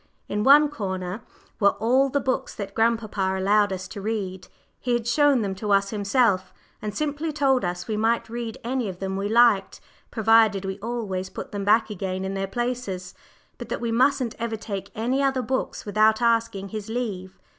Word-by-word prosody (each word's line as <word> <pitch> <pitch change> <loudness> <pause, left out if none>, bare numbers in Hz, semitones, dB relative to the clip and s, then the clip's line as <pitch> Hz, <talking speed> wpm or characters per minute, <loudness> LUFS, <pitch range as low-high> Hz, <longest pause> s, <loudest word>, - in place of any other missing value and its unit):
In 210 - -2
one 290 +4 +7
corner 190 -6 -4 0.4
were 200 -1 +4
all 260 +5 +3
the 285 - +1
books 265 0 -2
that 200 -1 -6
grandpapa 215 -4 0
allowed 205 +1 +3
us 185 0 -4
to 200 - -7
read. 190 -3 -3 0.3
He 245 - -1
had 240 -1 -1
shown 280 -1 +3
them 195 -1 -2
to 205 +2 -4
us 195 0 +3
himself, 205 -2 +1 0.3
and 210 -1 -4
simply 305 +1 -2
told 275 -4 +2
us 175 -1 -3
we 215 -2 -2
might 225 +2 +1
read 230 -1 -5
any 245 -2 -1
of 185 - -7
them 190 0 -3
we 200 +1 -2
liked, 225 -3 +4 0.3
provided 220 -3 +3
we 190 +1 -4
always 200 -5 -3
put - - -8
them 200 -1 -4
back 215 +1 +3
again 190 -1 -3
in 190 - -3
their 195 0 -2
places, 235 -5 -3 0.5
but - - -8
that - - -2
we 235 -1 -2
mustn't 250 0 +2
ever 230 -1 -2
take 200 -2 -6
any 245 +5 0
other 270 -2 +1
books 260 +3 -3
without 215 +1 +3
asking 230 -4 +1
his 215 0 -6
leave. 205 -6 -4
220 Hz, 190 wpm, -24 LUFS, 195-240 Hz, 0.5 s, one